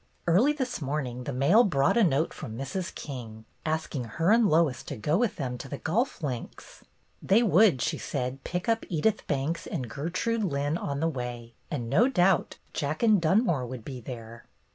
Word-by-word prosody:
Early 195 - +4
this 260 - -3
morning 130 -3 -3
the 140 - -3
mail 140 - +5
brought 140 - +2
a 235 - +5
note 155 -3 +2
from 110 0 -7
Mrs. 175 +8 -4
King, 115 -6 -8 0.2
asking 155 -5 -2
her 165 - +1
and 225 -1 +5
Lois 155 -5 +2
to 140 - -5
go 150 +9 0
with 230 +3 +1
them 125 -4 -4
to 135 - -8
the 140 - -4
golf 210 - -1
links. 125 -5 -6 0.4
They 215 +5 +4
would, 190 - +4
she - - -1
said, 130 +2 -3
pick 180 0 -3
up 225 0 +1
Edith 190 +6 0
Banks 155 +5 -2
and 135 -9 -3
Gertrude 180 - -2
Lynn 145 -3 0
on 140 -4 -3
the 165 - +2
way, 120 -5 -5 0.2
and 120 -6 -3
no 175 - +4
doubt 190 -8 +2 0.2
Jack 150 +7 -2
and 215 -5 +5
Dunmore 165 - +2
would 125 -2 -8
be 130 -3 -6
there. 115 -1 -9
150 Hz, 185 wpm, -28 LUFS, 130-190 Hz, 0.4 s, mail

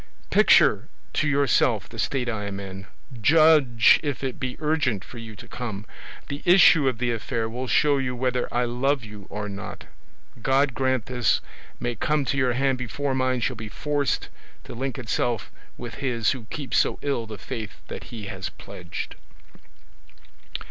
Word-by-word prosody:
Picture - - +5 0.2
to 155 - +1
yourself 130 -7 +2
the 115 - -10
state 130 0 0
I 110 -3 -2
am 100 -1 -4
in; 95 -1 -8 0.3
judge 150 -6 +6
if 145 -3 -3
it 130 -2 -3
be 130 -2 -3
urgent 145 -10 0
for 120 - -10
you 110 -2 -9
to - - -12
come; 110 -4 -5 0.4
the 140 +1 -5
issue 175 -5 +7
of 130 -3 +1
the 120 0 0
affair 115 0 -2
will 125 +3 -4
show 145 +2 +3
you 125 -2 -2
whether 125 0 -1
I 120 0 +1
love 125 +2 0
you 105 -3 -10
or 105 0 -4
not. 100 -1 -7 0.6
God 135 +2 +3
grant 130 -2 0
this 125 -2 +1 0.4
may 120 0 -1
come 145 +6 0
to 140 - -1
your 125 -2 +2
hand 135 0 +1
before 135 +3 -2
mine 130 -1 +1
shall 130 +2 0
be 110 -1 -7
forced 145 +5 -1 0.3
to - - -9
link 130 +3 -3
itself 120 -2 -1 0.3
with 120 -1 -7
his 120 -5 +1
who 130 -5 -5
keeps 140 +4 -1
so - - +1
ill 135 -6 -1
the 110 -1 -7
faith 110 +2 -7
that - - -7
he 110 -4 -8
has 95 -2 -5
pledged. - - -7
125 Hz, 170 wpm, -25 LUFS, 110-135 Hz, 0.6 s, issue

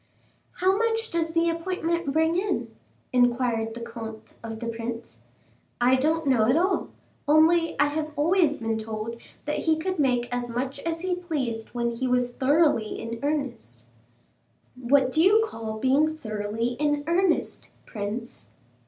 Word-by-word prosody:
"How 375 +1 +2
much 455 +1 0
does 335 -1 +1
the 330 +1 +1
appointment 335 -2 -2
bring 320 +3 +2
in?" 390 +4 -1 0.4
inquired 240 -2 +2
the 235 - -7
comte 225 -1 -8
of 225 -1 -6
the 235 - -5
prince. 230 0 -5 0.6
"I 250 +2 +5
don't 315 +4 +1
know 250 -6 +3
at 255 +6 +4
all, 375 +3 +1 0.4
only 320 +2 +4
I 290 - +6
have 310 +1 -3
always 315 0 +3
been 225 -1 -2
told 220 +1 -5 0.2
that 295 - -1
he 320 -1 +2
could 370 +2 -3
make 250 -4 +2
as 245 0 -2
much 260 +4 -3
as 330 +2 -3
he 370 0 -1
pleased 275 -12 -3
when 235 0 0
he 255 +2 -2
was 250 -1 +1
thoroughly 280 -5 +2
in 230 0 -5
earnest." 260 - -3 0.9
"What 260 +1 +2
do 315 - +2
you 420 +5 +5
call 225 - -6
being 285 +6 +2
thoroughly 215 -2 -2
in 295 -1 +1
earnest, 345 +1 0 0.2
prince?" 210 - -6
270 Hz, 155 wpm, -26 LUFS, 230-325 Hz, 0.9 s, I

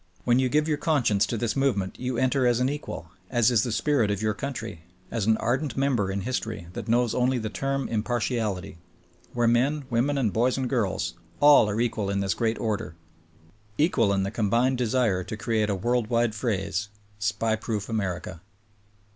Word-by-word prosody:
When 120 +3 +3
you 130 -1 +2
give 150 +3 +2
your 150 -2 0
conscience 120 -11 +2
to 115 - -2
this 110 -1 -1
movement 125 -9 0
you 125 -1 -2
enter 130 0 +2
as 120 -1 +2
an 125 +1 +2
equal, 140 - -6 0.2
as 120 -1 +3
is 115 -4 +4
the 120 - -2
spirit 110 +3 +1
of 100 -2 -1
your 110 0 0
country, 110 - -5 0.3
as 110 -4 -1
an 110 0 +4
ardent 130 +3 -1
member 130 -8 +1
in 100 +1 -2
history 110 -5 -3
that - - -6
knows 120 0 +2
only 125 +1 +2
the 110 -2 -3
term 135 +1 -2
impartiality; 110 -5 -2 0.5
where 120 -1 +2
men, 135 +5 +2
women 130 +5 +1
and 115 -7 +1
boys 125 +4 +2
and 130 -1 -1
girls 100 -9 -1
— 85 - -31
all 145 -7 +7
are 105 +2 -2
equal 110 -4 0
in 100 0 0
this 95 -2 0
great 115 +5 0
order; 105 -6 -3 0.8
equal 135 - +3
in 100 -1 +1
the 100 - -2
combined 120 +4 +1
desire 115 -6 +1
to 100 +4 -6
create 110 -1 0
a 100 - +1
world 120 +4 0
wide 115 -1 +1
phrase, 105 -2 -2 0.3
SPY 110 +2 0
,proof 105 -2 -3
America. 95 -5 -3
115 Hz, 190 wpm, -26 LUFS, 105-125 Hz, 0.8 s, all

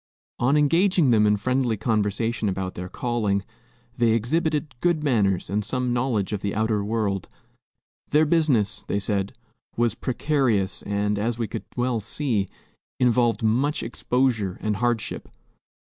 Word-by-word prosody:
On 135 +5 +3
engaging 165 0 +3
them 105 -2 +4
in 105 0 +3
friendly 125 +1 0
conversation 110 +1 0
about 95 -1 -3
their 90 +1 -6
calling, 105 -5 -1 0.5
they 120 -2 +3
exhibited 150 +5 0
good 170 -1 +1
manners 105 -10 +1
and 105 +3 -1
some 125 +2 -1
knowledge 120 -6 0
of 105 - -2
the 100 0 -2
outer 110 -1 +1
world. 105 -3 -1 0.8
Their 150 +2 +4
business, 145 -10 +1
they - - 0
said, 100 -1 -1 0.4
was 120 -2 +2
precarious 120 -7 0
and, 105 0 -1
as 115 +2 -1
we 115 -2 -2
could 105 - -6
well 120 -1 +1
see, 110 -2 -1 0.5
involved 120 -2 +2
much 125 +7 +1
exposure 115 -5 0
and 105 -2 -1
hardship. 120 -1 -2
115 Hz, 140 wpm, -24 LUFS, 105-130 Hz, 0.8 s, them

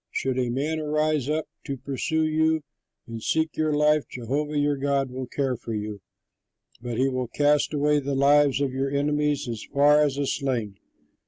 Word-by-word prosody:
Should 130 -1 -1
a 125 -1 0
man 150 +6 -1
rise 150 -2 0
up 155 0 0 0.2
to 140 - -4
pursue 140 +4 -1
you 160 0 +1 0.4
and 115 -1 -7
seek 160 +6 0
your 155 -1 0
life, 150 0 +3
Jehovah 145 +5 -3
your 145 0 +2
God 140 -1 0
will 130 0 -5
care 135 0 -1
for 115 -1 -6
you, 105 -1 -5 0.8
but 120 -2 -4
he 130 - +3
will 130 -2 -2
cast 145 +4 +2
away 150 0 +2
the 140 0 -3
lives 140 0 +4
of 135 -2 0
your 135 +1 -1
enemies 145 0 0
as 115 -3 -4
from 145 +1 +4
a 140 +1 -2
sling. 120 -8 -2
140 Hz, 175 wpm, -25 LUFS, 130-150 Hz, 0.8 s, lives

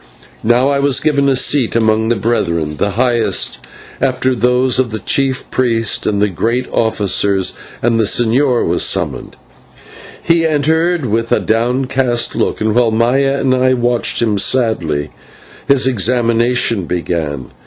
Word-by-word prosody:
Now 120 +4 +2
I 140 -1 0
was 140 -1 +1
given 140 -2 +1
a 135 - +2
seat 130 -2 +1
among 110 -1 +1
the 120 - +2
Brethren 85 -9 -2
the 100 +4 -1
highest, 120 -2 +1 0.4
indeed, 135 - +3
after 130 0 -1
those 125 +2 +1
of 130 -2 +1
the 110 - -4
chief 135 +5 -1
priest 115 -4 0
and 100 -1 0
the 105 - +2
great 115 +7 -2
officers 100 -3 +1 0.3
and 115 -1 +1
the 110 - +2
señor 120 +4 +1
was 85 +1 0
summoned. - - -2 0.8
He 165 0 +1
entered 160 +1 0
with 115 +1 -2
a - - +3
downcast 125 +1 0
look, - - -1
and 110 0 0
while 120 0 +2
Maya 130 +5 +1
and 130 -1 +1
I 130 0 +2
watched 120 -1 0
him 105 -3 0
sadly, 90 - 0 0.6
his 140 -2 +3
examination 115 -2 +1
began. 80 -6 -4
120 Hz, 150 wpm, -14 LUFS, 110-130 Hz, 0.8 s, indeed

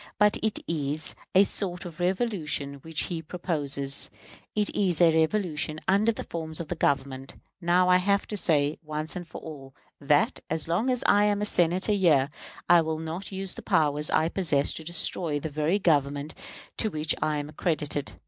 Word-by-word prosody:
But 210 0 +4
it 220 -1 0
is 150 -1 -2 0.2
a 190 - +8
sort 185 -3 -3
of 170 -2 -9
revolution 175 -7 -1
which 160 +1 -2
he 170 -2 -3
proposes; 145 -5 -1 0.5
it 210 -1 +1
is 185 -6 +1
a 170 -2 +6
revolution 160 -2 0
under 200 +4 +4
the 215 - -6
forms 160 -2 -5
of 170 - -6
the 175 - -2
Government. 135 -3 -1 0.3
Now, 180 +1 +3
I 180 0 +6
have 200 +2 +1
to 210 - -3
say, 150 -5 +2
once 155 0 -5
for 175 -3 -7
all, 135 -4 -10 0.2
that, 145 +1 +2
as 160 -2 -1
long 180 +10 +1
as 250 -1 0
I 205 0 +5
am 205 -1 +1
a 210 - 0
Senator 180 +1 +2
here, 155 -8 +3 0.4
I 175 -1 +7
will 160 0 -2
not 160 +5 -5
use 190 -1 -4
the - - -8
powers 150 0 +1
I 155 +1 +2
possess 155 -7 +1
to 160 - -6
destroy 160 -2 +1
the 155 +1 -5
very 155 +6 +1
Government 145 -4 +1 0.4
to 220 - +2
which 155 -3 0
I 150 -1 +1
am 145 0 -4
accredited. 150 -2 -2
160 Hz, 180 wpm, -27 LUFS, 150-185 Hz, 0.5 s, a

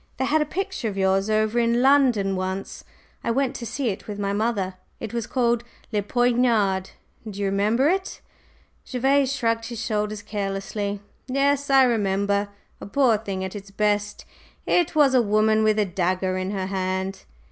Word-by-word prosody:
"They 265 - 0
had 305 +3 +2
a - - +1
picture 380 - -3
of 195 - -7
yours 195 +1 +2
over 215 +2 +1
in 235 +1 +2
London 250 -8 +4
once; 190 +1 -4 0.4
I - - -2
went 270 +2 0
to 235 - -6
see 255 +2 -2
it 195 - -6
with 205 -1 -5
my 200 -1 -1
mother. 205 -3 -1 0.3
It 225 -1 -6
was 235 -2 -2
called 240 -2 +1 0.3
'Le 210 -2 +1
Poignard,' 230 -4 +1 0.4
do 200 -1 -8
you 200 - 0
remember 210 +7 +2
it?" 380 +3 -1 0.6
Gervase 270 +1 +1
shrugged 230 -4 0
his 235 -1 -6
shoulders 210 -1 -2
carelessly. 200 0 -3 0.3
"Yes, 280 +2 +1
I 270 -1 +6
remember. 200 -3 +1 0.3
A - - -7
poor 250 +1 +3
thing 195 -3 -4
at 190 +2 -5
its 200 -1 -8
best. 210 +1 -1 0.4
It 345 -3 +1
was 290 -3 +5
a 255 - +5
woman 215 0 +2
with 215 0 +3
a 210 - +3
dagger 185 0 -1
in 185 0 -2
her 195 -2 -2
hand." 190 0 -3
215 Hz, 175 wpm, -24 LUFS, 195-245 Hz, 0.6 s, I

